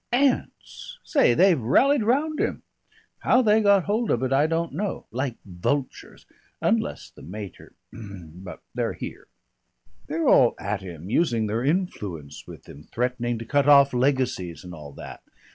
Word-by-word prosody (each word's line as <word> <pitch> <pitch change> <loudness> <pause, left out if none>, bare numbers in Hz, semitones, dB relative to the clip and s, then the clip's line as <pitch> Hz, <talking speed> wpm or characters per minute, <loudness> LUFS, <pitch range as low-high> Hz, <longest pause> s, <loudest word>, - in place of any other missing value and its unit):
"Aunts. 275 - -1
Say, 275 - +3
they've 180 -4 +4
rallied 270 - +3
round 285 +8 +1
him. - - -2 0.6
How 255 - +3
they 215 0 +4
got 200 -3 +4
hold 215 +4 -1
of 120 - +1
it 130 0 0
I 145 +3 +3
don't 165 -1 -2
know. 200 +6 -3
Like 125 +1 -2
vultures. 105 +9 -4 0.3
Unless - - -1
the - - -16
mater 100 +2 -9 0.2
But 95 -4 -10
they're - - -1
here. - - -8 0.8
They're 160 +2 -1
all 125 - +5
at 100 0 -3
him 90 0 -9
using 120 -7 +1
their 110 +3 -2
influence 105 - -3
with - - -12
him, 75 +2 -13
threatening 120 -1 -1
to 115 - -7
cut 145 +4 +2
off 140 -1 +7
legacies 125 - 0
and 90 -1 -9
all 75 -3 -10
that. - - -10
130 Hz, 155 wpm, -24 LUFS, -, 0.8 s, off